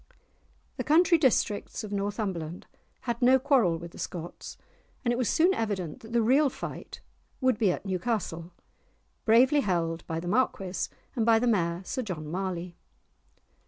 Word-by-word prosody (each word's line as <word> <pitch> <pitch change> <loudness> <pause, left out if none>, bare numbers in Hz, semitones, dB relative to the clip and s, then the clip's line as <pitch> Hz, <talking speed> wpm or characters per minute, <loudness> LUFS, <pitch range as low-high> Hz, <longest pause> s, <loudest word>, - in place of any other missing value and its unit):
The - - -2
country 335 +2 +4
districts 235 -6 +1
of 210 - -7
Northumberland 195 -5 -3 0.4
had 235 -1 -3
no 255 +2 +6
quarrel 255 - +3
with 170 +1 -9
the - - -13
Scots, 170 -1 -6 0.5
and 240 - +3
it - - 0
was 245 -2 0
soon 350 +4 +4
evident 195 - -3
that 225 - -12
the 235 -1 +2
real 275 +5 +4
fight - - -8 0.4
would 255 -4 +2
be 205 -5 +3
at 175 - -5
Newcastle, 185 -3 -2 0.7
bravely 250 +6 +5
held 170 -7 -1
by 165 -1 -2
the 175 - -6
Marquis 195 -3 0 0.3
and 235 - +1
by 225 0 +5
the 235 - +1
Mayor, 175 -6 +1
Sir 260 - -3
John 180 -9 -5
Marley. 180 -1 -3
210 Hz, 160 wpm, -28 LUFS, 175-245 Hz, 0.7 s, no